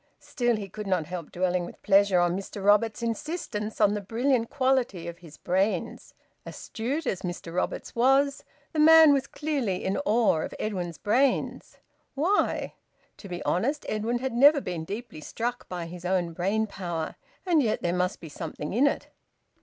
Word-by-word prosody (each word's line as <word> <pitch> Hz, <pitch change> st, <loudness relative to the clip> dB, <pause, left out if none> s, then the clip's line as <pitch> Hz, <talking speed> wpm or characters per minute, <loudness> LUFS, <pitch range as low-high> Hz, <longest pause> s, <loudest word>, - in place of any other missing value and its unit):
Still, 240 Hz, -2 st, -1 dB
he 205 Hz, -2 st, -5 dB
could 210 Hz, +2 st, -7 dB
not 180 Hz, -5 st, +1 dB
help 170 Hz, -1 st, -7 dB
dwelling 180 Hz, 0 st, 0 dB
with 175 Hz, -, -9 dB
pleasure 195 Hz, -2 st, +4 dB
on 175 Hz, 0 st, +2 dB
Mr 195 Hz, +1 st, -6 dB
Roberts's 210 Hz, +2 st, +3 dB
insistence 230 Hz, -, -3 dB
on 205 Hz, -1 st, +4 dB
the 210 Hz, -, -2 dB
brilliant 230 Hz, +3 st, 0 dB
quality 255 Hz, -10 st, 0 dB
of 170 Hz, 0 st, -7 dB
his 160 Hz, -3 st, -14 dB
brains. 190 Hz, +4 st, -1 dB, 0.3 s
Astute 270 Hz, +8 st, -4 dB
as 190 Hz, -, -2 dB
Mr 175 Hz, -2 st, -6 dB
Roberts 180 Hz, -, -3 dB
was, 270 Hz, +3 st, +3 dB, 0.3 s
the 310 Hz, -, -1 dB
man 320 Hz, -1 st, +8 dB
was 275 Hz, -2 st, 0 dB
clearly 275 Hz, -12 st, -2 dB
in 190 Hz, -, 0 dB
awe 220 Hz, -, +3 dB
of -, -, -5 dB
Edwin's 180 Hz, -6 st, -3 dB
brains! 250 Hz, -, 0 dB, 0.4 s
Why? 350 Hz, +9 st, +1 dB, 0.4 s
To 200 Hz, -, -11 dB
be 175 Hz, 0 st, -5 dB
honest, 275 Hz, -, 0 dB
Edwin 220 Hz, +3 st, -1 dB
had 260 Hz, 0 st, -3 dB
never 285 Hz, +5 st, +6 dB
been 175 Hz, -9 st, -5 dB
deeply 205 Hz, -4 st, -7 dB
struck 240 Hz, -, -4 dB
by 175 Hz, -2 st, -4 dB
his 175 Hz, +1 st, -9 dB
own 180 Hz, -2 st, 0 dB
brain 195 Hz, +6 st, 0 dB
power. 175 Hz, -6 st, -4 dB, 0.3 s
And 340 Hz, -5 st, +4 dB
yet 220 Hz, -4 st, -1 dB
there 175 Hz, 0 st, +1 dB
must 180 Hz, +1 st, -1 dB
be 165 Hz, -, -9 dB
something 150 Hz, 0 st, -6 dB
in 260 Hz, +7 st, +4 dB
it! -, -, -2 dB
210 Hz, 170 wpm, -27 LUFS, 180-255 Hz, 0.4 s, man